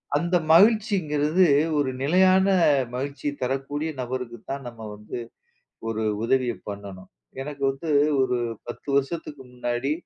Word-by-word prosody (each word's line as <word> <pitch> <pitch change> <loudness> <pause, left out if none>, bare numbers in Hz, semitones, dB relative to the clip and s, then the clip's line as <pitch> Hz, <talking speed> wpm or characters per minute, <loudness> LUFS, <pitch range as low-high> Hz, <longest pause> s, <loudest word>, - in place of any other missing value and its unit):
அந்த 170 +4 +1 0.2
மகிழ்ச்சிங்கிறது, 185 -5 +4 0.3
ஒரு 145 -2 +1
நிலையான 185 +6 +4 0.5
மகிழ்ச்சி 140 +3 -4
தரக்கூடிய 135 +4 -2
நபருக்கு 125 -1 -4
தான், 140 0 -4
நம்ம 120 -1 -10 0.2
வந்து 105 +2 -8 0.7
ஒரு 110 0 -2 0.2
உதவிய 125 0 +2 0.2
பண்ணணும். 100 -2 -8 0.3
எனக்கு 140 0 -8
வந்து 135 +4 -7 0.3
ஒரு 130 -1 +1 0.3
10 120 - -9
வருஷத்துக்கு 145 0 -2
முன்னாடி 125 +2 -2
135 Hz, 115 wpm, -25 LUFS, 125-160 Hz, 0.7 s, மகிழ்ச்சிங்கிறது